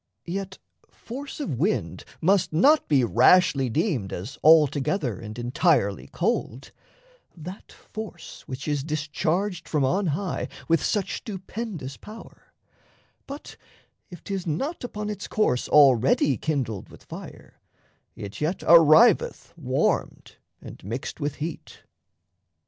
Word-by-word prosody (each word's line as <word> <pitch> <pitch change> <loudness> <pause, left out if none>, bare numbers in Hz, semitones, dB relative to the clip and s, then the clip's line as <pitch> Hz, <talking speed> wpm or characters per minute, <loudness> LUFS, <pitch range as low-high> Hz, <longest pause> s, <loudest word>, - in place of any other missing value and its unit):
Yet 190 +2 -5 0.3
force 275 +5 -9
of 190 - -3
wind 195 +8 -1 0.2
must 185 +2 +2
not 280 - +4
be 140 -4 +3
rashly 135 +3 +4
deemed 135 - -1
As 100 +9 -6
altogether 145 - +3
and 110 0 -8
entirely 120 - +1
cold 125 +5 -2 0.7
That 180 +5 -10
force 215 -6 -9
which 135 +3 -6
is 145 -2 -1
discharged 160 +5 -2
from 150 -3 +1
on 185 +8 +1
high 165 +4 -2 0.2
With 165 -1 +2
such 205 -4 -1
stupendous 190 - -6
power; 220 +2 -13 0.8
but 280 +2 -9 0.5
if 175 -4 -12
'tis 195 -3 -4
not 270 - -3
Upon 210 -3 -5
its 205 -1 -5
course 170 -13 0
already 135 -1 +5
kindled 125 -7 -3
with - - -15
fire, - - -11 0.5
It 100 +6 -8
yet 160 +5 -1
arriveth 170 +6 +5
warmed 135 -5 -1 0.2
and - - -11
mixed 115 - -5
with 145 -1 -2
heat. 155 +3 -7
160 Hz, 120 wpm, -25 LUFS, 135-195 Hz, 0.8 s, already